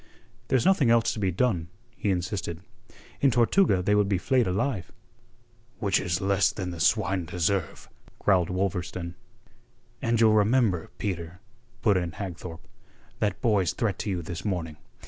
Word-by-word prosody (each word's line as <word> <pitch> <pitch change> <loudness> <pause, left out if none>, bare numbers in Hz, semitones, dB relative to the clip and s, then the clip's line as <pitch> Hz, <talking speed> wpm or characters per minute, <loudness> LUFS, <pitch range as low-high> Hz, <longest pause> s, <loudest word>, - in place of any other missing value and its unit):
"There's 130 -2 +2
nothing 175 -10 +4
else 115 -1 +3
to - - -6
be 95 -2 +1
done," 90 -3 0 0.3
he 105 - -2
insisted. 90 -2 -2 0.6
"In 140 - +5
Tortuga 120 - +3
they 105 - +2
would 105 -1 +3
be 100 - +2
flayed 125 +5 +2
alive." 100 0 -1 0.9
"Which 100 -5 +1
is 90 -2 -1
less 95 0 +2
than 90 -3 -5
the 85 - -7
swine 90 +4 +2
deserve," 90 +2 -2 0.3
growled 90 -4 +2
Wolverstone. 90 -2 -2 0.9
"And 115 -1 +1
you'll 110 -1 +5
remember, 105 -4 +2
Peter," 90 -3 -4 0.4
put 105 -4 +4
in 85 -3 -2
Hagthorpe, 90 -3 -7 0.5
"that 105 -2 -1
boy's 100 -6 +2
threat 105 -5 -1
to 105 - -3
you 90 -3 -2
this 85 +4 -6
morning. 85 -7 -3
95 Hz, 150 wpm, -27 LUFS, 90-110 Hz, 0.9 s, In